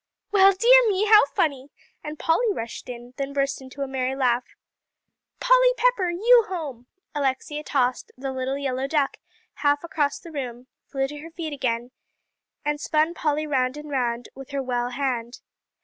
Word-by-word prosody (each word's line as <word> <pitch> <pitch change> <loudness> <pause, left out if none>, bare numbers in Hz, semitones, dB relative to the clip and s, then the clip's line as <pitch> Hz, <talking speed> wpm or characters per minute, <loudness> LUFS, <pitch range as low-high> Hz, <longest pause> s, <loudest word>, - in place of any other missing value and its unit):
"Well, 390 -1 +7
dear 485 +5 +6
me, 400 +1 +1
how 425 -7 +7
funny!" 280 -2 -1 0.3
and 300 0 -6
Polly 415 +10 +2
rushed 230 - -6
in; 245 0 -9
then 275 0 -3
burst 275 -1 -1
into 265 +2 -6
a - - -3
merry 265 0 -2
laugh. 250 -2 0 0.8
"Polly - - +5
Pepper 485 -8 +2
you 455 +7 +5
home!" 285 -10 -6 0.3
Alexia 290 +1 -2
tossed 255 -4 0
"The 270 +1 -4
Little 260 +1 -2
Yellow 265 -1 -2
Duck" 285 -2 0 0.4
half 290 +1 +1
across 305 -1 -1
the 345 -6 -12
room, 250 -4 -6 0.2
flew 270 -1 -1
to 295 +1 -8
her 320 +3 -9
feet 325 -2 -6
again, 245 -3 -2 0.7
and 295 0 -1
spun 310 +3 +1
Polly 305 -2 -1
round 260 -2 0
and 300 0 -8
round 245 -3 -1
with 270 0 -11
her 280 -1 -2
well 245 -1 -1
hand. 245 -2 -3
280 Hz, 165 wpm, -24 LUFS, 255-325 Hz, 0.8 s, Well